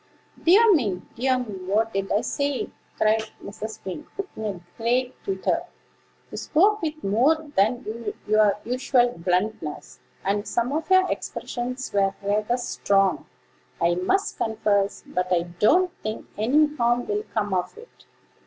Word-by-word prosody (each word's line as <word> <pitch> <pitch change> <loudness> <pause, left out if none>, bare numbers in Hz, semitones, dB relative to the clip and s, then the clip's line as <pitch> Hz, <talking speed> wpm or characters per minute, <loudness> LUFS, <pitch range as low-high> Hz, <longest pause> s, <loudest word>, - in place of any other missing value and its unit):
"Dear 415 +6 +7
me! 205 - 0
dear 255 +2 +2
me! 215 -6 -5
what 220 +3 +1
did 195 0 -2
I 210 - +3
say?" 280 -2 -2 0.3
cried 220 +1 +3 0.2
Mrs. 215 +2 -7
Wing, 195 +11 -6 0.3
in 220 - -6
a 200 -4 -3 0.2
great 245 +2 -1
twitter. 195 - 0 0.7
"You - - -6
spoke 415 +7 +3
with 310 -1 -4
more 235 +11 +4 0.2
than 235 +6 +2 0.4
your 215 -1 +4
usual 250 0 +2
bluntness, 180 -1 -2 0.3
and 205 +2 0
some 240 +2 0
of 315 +3 -2
your 375 0 +5
expressions 250 +1 -4
were 195 -1 +2
rather 210 +4 +1
strong, 195 -5 +1 0.5
I 170 +1 +3
must 185 - 0
confess; 205 -3 0
but 180 +1 -2
I 175 -1 +3
don't 215 - +3
think 215 0 -4
any 295 +8 +3
harm 240 0 +2
will 420 0 -1
come 205 -2 0
of 180 - -2
it. 465 +2 -16
220 Hz, 145 wpm, -25 LUFS, 200-270 Hz, 0.7 s, Dear